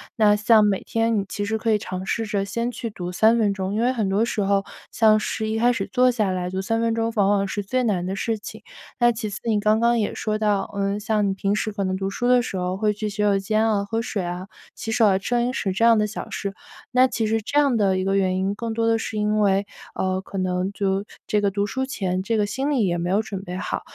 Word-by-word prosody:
那 210 Hz, -2 st, +4 dB
像 210 Hz, +1 st, +5 dB
每 200 Hz, -2 st, +1 dB
天 225 Hz, 0 st, 0 dB
你 -, -, -1 dB
其 205 Hz, -, -3 dB
实 220 Hz, +2 st, -1 dB
可 220 Hz, +1 st, 0 dB
以 215 Hz, -, +4 dB
尝 185 Hz, -2 st, -5 dB
试 225 Hz, +4 st, -2 dB
着 205 Hz, -2 st, -1 dB
先 235 Hz, +4 st, -2 dB
去 235 Hz, -1 st, -5 dB
读 180 Hz, -4 st, -6 dB
3 220 Hz, +5 st, +4 dB
分 210 Hz, -3 st, +2 dB
钟， 195 Hz, 0 st, -3 dB
因 -, -, 0 dB
为 245 Hz, +2 st, +2 dB
很 220 Hz, -6 st, -1 dB
多 205 Hz, +4 st, +2 dB
时 225 Hz, -, -2 dB
候， 195 Hz, 0 st, +1 dB, 0.3 s
像 215 Hz, -1 st, +4 dB
是 220 Hz, +1 st, -3 dB
一 220 Hz, +1 st, -1 dB
开 240 Hz, +2 st, +4 dB
始 205 Hz, -5 st, -2 dB
坐 255 Hz, 0 st, +5 dB
下 215 Hz, -6 st, 0 dB
来 180 Hz, -1 st, -2 dB
读 190 Hz, +1 st, -3 dB
3 225 Hz, +3 st, 0 dB
分 230 Hz, -1 st, +1 dB
钟 230 Hz, 0 st, -1 dB
往 200 Hz, -2 st, +3 dB
往 200 Hz, -1 st, +2 dB
是 205 Hz, -, -3 dB
最 255 Hz, +6 st, -1 dB
难 200 Hz, -7 st, 0 dB
的 190 Hz, -, -2 dB
事 220 Hz, +2 st, -2 dB
情。 210 Hz, -, -10 dB, 0.4 s
那 240 Hz, 0 st, +5 dB
其 220 Hz, -2 st, -4 dB
次， 205 Hz, -, -5 dB
你 220 Hz, -3 st, +1 dB
刚 215 Hz, +1 st, +2 dB
刚 235 Hz, 0 st, +3 dB
也 210 Hz, -, -1 dB
说 215 Hz, -1 st, -1 dB
到， 210 Hz, -2 st, +1 dB
呃， 200 Hz, 0 st, -1 dB
像 210 Hz, -1 st, 0 dB
你 -, -, 0 dB
平 195 Hz, +1 st, -1 dB
时 215 Hz, +1 st, -1 dB
可 200 Hz, -1 st, -2 dB
能 185 Hz, 0 st, -1 dB
读 195 Hz, 0 st, -2 dB
书 245 Hz, +5 st, -2 dB
的 250 Hz, -1 st, +5 dB
时 240 Hz, -, -5 dB
候 180 Hz, 0 st, -2 dB
会 210 Hz, +1 st, +1 dB
去 210 Hz, +1 st, -3 dB
洗 200 Hz, -, -9 dB
手 205 Hz, -1 st, +3 dB
间 215 Hz, +3 st, +1 dB
啊、 205 Hz, -2 st, +1 dB
喝 225 Hz, +2 st, -2 dB
水 210 Hz, -4 st, -3 dB
啊、 180 Hz, +2 st, -5 dB, 0.3 s
洗 225 Hz, -, -5 dB
手 220 Hz, -, +4 dB
啊、 195 Hz, -2 st, +4 dB
吃 220 Hz, +5 st, -2 dB
零 240 Hz, +1 st, 0 dB
食 195 Hz, -, -1 dB
这 210 Hz, -, -1 dB
样 230 Hz, -1 st, +6 dB
的 210 Hz, 0 st, +2 dB
小 215 Hz, -, -7 dB
事， 200 Hz, -1 st, -4 dB, 0.4 s
那 255 Hz, 0 st, +5 dB
其 225 Hz, -3 st, -1 dB
实 225 Hz, +1 st, 0 dB
这 285 Hz, +7 st, +1 dB
样 280 Hz, -4 st, +3 dB
的 195 Hz, -3 st, +2 dB
一 -, -, -1 dB
个 195 Hz, 0 st, +1 dB
原 185 Hz, -1 st, +1 dB
因， 190 Hz, +2 st, -1 dB
更 230 Hz, +1 st, -4 dB
多 230 Hz, 0 st, 0 dB
的 225 Hz, 0 st, +3 dB
是 225 Hz, -1 st, -4 dB
因 210 Hz, 0 st, +1 dB
为 200 Hz, 0 st, +2 dB, 0.3 s
呃， 185 Hz, 0 st, -1 dB
可 195 Hz, -, -8 dB
能 185 Hz, 0 st, -1 dB
就 195 Hz, -1 st, -1 dB, 0.2 s
这 210 Hz, -, +1 dB
个 200 Hz, -1 st, +1 dB
读 200 Hz, +1 st, -1 dB
书 265 Hz, +5 st, -2 dB
前 185 Hz, -8 st, -2 dB
这 225 Hz, +3 st, 0 dB
个 210 Hz, -, +2 dB
心 265 Hz, +7 st, -2 dB
理 250 Hz, -7 st, +2 dB
也 175 Hz, -1 st, 0 dB
没 175 Hz, +1 st, -2 dB
有 200 Hz, +3 st, +2 dB
准 200 Hz, -3 st, -6 dB
备 180 Hz, -1 st, -6 dB
好。 185 Hz, -, -3 dB
210 Hz, 295 characters per minute, -23 LUFS, 195-225 Hz, 0.4 s, 样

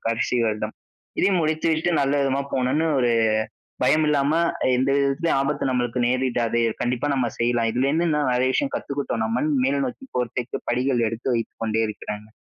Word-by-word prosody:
கடைசி 115 Hz, +2 st, 0 dB
வருடம் 110 Hz, 0 st, -2 dB, 0.4 s
இதையும் 190 Hz, -2 st, +3 dB
முடித்து 155 Hz, +1 st, 0 dB
விட்டு 160 Hz, +2 st, 0 dB
நல்ல 140 Hz, 0 st, +1 dB
விதமா 135 Hz, 0 st, 0 dB
போணுன்னு, 135 Hz, +5 st, +1 dB
ஒரு 120 Hz, -2 st, +2 dB, 0.7 s
பயம் 155 Hz, 0 st, +3 dB
இல்லாம 145 Hz, -1 st, +2 dB, 0.4 s
எந்த 130 Hz, +2 st, +1 dB
விதத்திலும் 140 Hz, +4 st, +1 dB
ஆபத்து 140 Hz, 0 st, -1 dB
நமக்கு 125 Hz, -1 st, -1 dB
நேரிடாது. 120 Hz, -2 st, 0 dB, 0.2 s
கண்டிப்பா 125 Hz, +3 st, -1 dB
நம்ம 130 Hz, -3 st, +1 dB
செய்யலாம். 120 Hz, -1 st, +1 dB
இதுலருந்து 140 Hz, +8 st, +1 dB
நிறைய 130 Hz, -3 st, +1 dB
விஷயம் 280 Hz, -, -1 dB
கத்துக்கிட்டோம் 140 Hz, -5 st, -3 dB
நம்மன்னு. 125 Hz, +5 st, 0 dB
மேல 140 Hz, +1 st, +1 dB
நோக்கி 200 Hz, -, -7 dB
போறதுக்கு 125 Hz, 0 st, -3 dB
படிகள் 125 Hz, -1 st, +1 dB
எடுத்து 115 Hz, +3 st, -2 dB
வைத்துக் 115 Hz, 0 st, -5 dB
கொண்டே 110 Hz, 0 st, 0 dB
இருக்கிறேங்க. 105 Hz, 0 st, -7 dB
130 Hz, 155 wpm, -23 LUFS, 120-140 Hz, 0.7 s, இதையும்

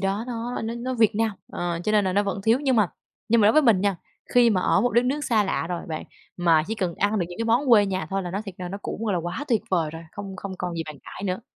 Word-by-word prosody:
đó 195 Hz, +3 st, -1 dB
nó 240 Hz, -1 st, -4 dB
nó 225 Hz, +1 st, -3 dB
nó 255 Hz, +2 st, -3 dB
Việt 225 Hz, -4 st, +3 dB
Nam, 225 Hz, +1 st, +1 dB, 0.2 s
ờ, 175 Hz, -1 st, -2 dB
cho 215 Hz, -, +1 dB
nên 210 Hz, -2 st, +4 dB
là 185 Hz, -, 0 dB
nó 205 Hz, -, +3 dB
vẫn 200 Hz, -1 st, -3 dB
thiếu, 225 Hz, +3 st, +4 dB
nhưng 265 Hz, -4 st, +2 dB
mà 210 Hz, -4 st, +4 dB, 0.4 s
nhưng 230 Hz, +1 st, +4 dB
mà 205 Hz, -, +5 dB
đối 215 Hz, -, +6 dB
với 310 Hz, -, +5 dB
mình 220 Hz, -8 st, +4 dB
nha, 200 Hz, -2 st, +1 dB, 0.4 s
khi 245 Hz, -1 st, +6 dB
mà 185 Hz, -4 st, +2 dB
ở 190 Hz, -, +3 dB
một 245 Hz, -, +2 dB
đất 240 Hz, +1 st, +4 dB
nước 290 Hz, +3 st, -1 dB
xa 220 Hz, -3 st, +2 dB
lạ 180 Hz, -, -1 dB
rồi 175 Hz, -1 st, -4 dB
bạn, 155 Hz, -1 st, -4 dB, 0.3 s
mà 165 Hz, -3 st, +4 dB
chỉ 220 Hz, -, -2 dB
cần 185 Hz, -6 st, -2 dB
ăn 205 Hz, +1 st, +1 dB
được 175 Hz, -, 0 dB
những 175 Hz, -, -10 dB
cái 230 Hz, -, -1 dB
món 235 Hz, +5 st, +2 dB
quê 210 Hz, -4 st, +6 dB
nhà 185 Hz, -4 st, -2 dB
thôi 195 Hz, 0 st, -1 dB
là 175 Hz, -, -5 dB
nó 195 Hz, -, -2 dB
thiệt 195 Hz, -4 st, -8 dB
ra 180 Hz, -1 st, -5 dB
nó 200 Hz, -, -5 dB
cũng, 225 Hz, -, -4 dB
gọi 210 Hz, -, 0 dB
là, 180 Hz, -, +1 dB
quá 175 Hz, -, -4 dB
tuyệt 220 Hz, -4 st, +2 dB
vời 165 Hz, -5 st, +1 dB
rồi, 165 Hz, +1 st, -8 dB
không 195 Hz, -1 st, -7 dB
không 200 Hz, 0 st, -6 dB
còn 180 Hz, -1 st, -3 dB
gì 165 Hz, -, -2 dB
bàn 155 Hz, -, -8 dB
cãi -, -, -9 dB
nữa. 185 Hz, +2 st, -2 dB
205 Hz, 315 wpm, -25 LUFS, 180-230 Hz, 0.4 s, đối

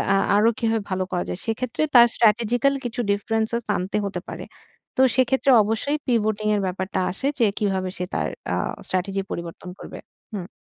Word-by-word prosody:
আ -, -, +4 dB, 0.2 s
আরো 215 Hz, +2 st, +5 dB
কিভাবে 225 Hz, -2 st, 0 dB
ভালো 185 Hz, 0 st, 0 dB
করা 175 Hz, -, 0 dB
যায়? 180 Hz, -, -4 dB
সেক্ষেত্রে 230 Hz, +4 st, -2 dB
তার 240 Hz, -1 st, +9 dB
স্ট্র্যাটেজিক্যাল 235 Hz, +4 st, +3 dB
কিছু 245 Hz, 0 st, -2 dB
differences 225 Hz, +3 st, -1 dB
আনতে 190 Hz, +3 st, -2 dB
হতে 190 Hz, -2 st, -3 dB
পারে। -, -, -6 dB, 0.5 s
তো -, -, +4 dB
সেক্ষেত্রে 265 Hz, +1 st, +3 dB
অবশ্যই 225 Hz, +8 st, -1 dB
pivoting 215 Hz, -3 st, +1 dB
এর 205 Hz, -, 0 dB
ব্যাপারটা 190 Hz, +1 st, -3 dB
আসে 230 Hz, +9 st, -3 dB
যে 235 Hz, -, +5 dB
কিভাবে 190 Hz, -3 st, 0 dB
সে 180 Hz, -, -2 dB
তার -, -, 0 dB, 0.3 s
আ -, -, +1 dB, 0.3 s
স্ট্র্যাটেজি 190 Hz, +1 st, -1 dB
পরিবর্তন 170 Hz, +1 st, -6 dB
করবে। -, -, -9 dB, 0.3 s
হুম। 185 Hz, -4 st, -4 dB
215 Hz, 170 wpm, -23 LUFS, 190-235 Hz, 0.5 s, তার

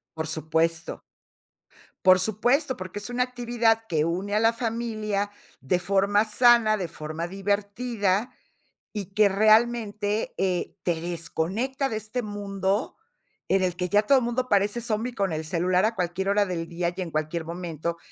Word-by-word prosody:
Por 160 Hz, 0 st, -3 dB
supuesto. 160 Hz, +1 st, -1 dB, 1.0 s
Por 185 Hz, 0 st, +7 dB
supuesto, 240 Hz, -, +1 dB
porque 185 Hz, +2 st, -6 dB
es 205 Hz, -, -6 dB
una 250 Hz, +1 st, +1 dB
actividad 235 Hz, -2 st, 0 dB
que 155 Hz, -3 st, +1 dB
une 190 Hz, +5 st, -2 dB
a -, -, +4 dB
la 225 Hz, +1 st, +4 dB
familia 220 Hz, -3 st, -2 dB, 0.3 s
de 155 Hz, +7 st, 0 dB
forma 200 Hz, +3 st, +2 dB
sana, 225 Hz, -1 st, +5 dB
de 185 Hz, -4 st, -3 dB
forma 155 Hz, +1 st, -5 dB
divertida. 205 Hz, +2 st, -1 dB, 0.6 s
Y 200 Hz, -3 st, -6 dB
que 210 Hz, -1 st, +6 dB
realmente, 215 Hz, 0 st, +2 dB
eh, 185 Hz, -2 st, -1 dB
te 170 Hz, -2 st, -1 dB
desconecta 175 Hz, -, -2 dB
de 220 Hz, -, -2 dB
este 220 Hz, +4 st, -4 dB
mundo, 200 Hz, -1 st, -2 dB, 0.5 s
en 190 Hz, 0 st, +3 dB
el 180 Hz, -1 st, 0 dB
que 180 Hz, 0 st, -2 dB
ya 205 Hz, +3 st, +4 dB
todo 265 Hz, +3 st, +4 dB
mundo 240 Hz, +2 st, -1 dB
parece 205 Hz, +4 st, +2 dB
zombi 230 Hz, +2 st, -1 dB
con 195 Hz, -5 st, -1 dB
el 155 Hz, 0 st, -3 dB
celular 180 Hz, +3 st, +1 dB
a 225 Hz, -, 0 dB
cualquier 180 Hz, +1 st, -2 dB
hora 205 Hz, 0 st, +3 dB
del 170 Hz, -3 st, -4 dB
día, 170 Hz, 0 st, -2 dB
y 190 Hz, -, -4 dB
en 175 Hz, -, -4 dB
cualquier 155 Hz, +2 st, -2 dB
momento. 170 Hz, -1 st, -4 dB
200 Hz, 160 wpm, -26 LUFS, 175-225 Hz, 1.0 s, Por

